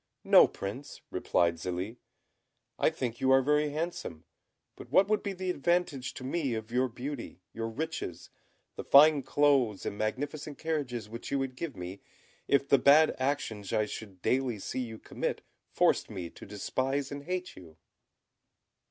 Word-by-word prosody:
"No, - - +7
Prince," 130 +9 -7
replied 85 -1 +1
Zélie; 90 +7 -4 0.8
"I - - +4
think 120 -2 -4
you 130 - +2
are 135 0 +6
very 150 +2 +2
handsome; 150 - -4 0.5
but - - -11
what 195 - +5
would 215 0 +1
be 200 - -3
the 185 0 -2
advantage 165 -5 0
to 130 - -7
me 135 -2 -1
of 110 +1 -6
your 125 +2 +2
beauty, 125 -4 -6
your 115 0 -3
riches, 150 - -5 0.5
the - - -4
fine 145 +1 +7
clothes 130 -6 +2
and 100 - -4
magnificent 145 +6 -3
carriages 140 -9 -3
which 115 +2 -7
you 140 - 0
would 135 -1 -2
give 155 0 -5
me, 90 +2 -7 0.5
if 140 0 +3
the 140 - +5
bad 150 +4 +6
actions 130 -7 -2
I 110 - +2
should 100 -3 -9
daily 130 -3 +1
see 100 - -4
you 115 -3 -4
commit - - -4 0.3
forced - - +2
me 85 -3 -6
to - - -12
despise 130 +7 -2
and 140 0 -6
hate 180 +1 -3
you?" 80 -4 -14
130 Hz, 160 wpm, -30 LUFS, 110-145 Hz, 0.8 s, No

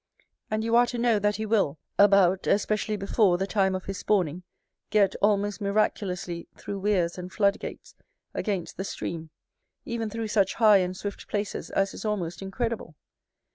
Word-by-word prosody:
And 215 0 -1
you 230 +1 +1
are 240 0 +6
to 240 - -4
know, 235 -2 +3
that 205 +1 +1
he 215 +2 -3
will, 200 -9 +1 0.2
about, 195 -2 +5
especially 210 +1 +1
before, 195 -2 +2
the 190 - -1
time 195 -2 +1
of 185 - -5
his 195 -1 -5
spawning, 180 -5 +1 0.5
get, 200 -3 +3
almost 205 0 +1
miraculously, 195 -4 -1
through 200 - -5
weirs 185 -4 +1
and 180 +1 -7
flood 200 -1 +2
gates, - - -8 0.4
against 195 -6 -3
the 190 - -2
stream; 165 -4 -5 0.6
even 230 -2 -3
through 225 0 -4
such 200 -3 +2
high 215 -3 +6
and 185 -1 -1
swift 205 +1 -6
places 205 -1 -3
as 195 0 0
is - - -8
almost 185 -6 -2
incredible. 200 -3 -3
200 Hz, 170 wpm, -27 LUFS, 185-215 Hz, 0.6 s, are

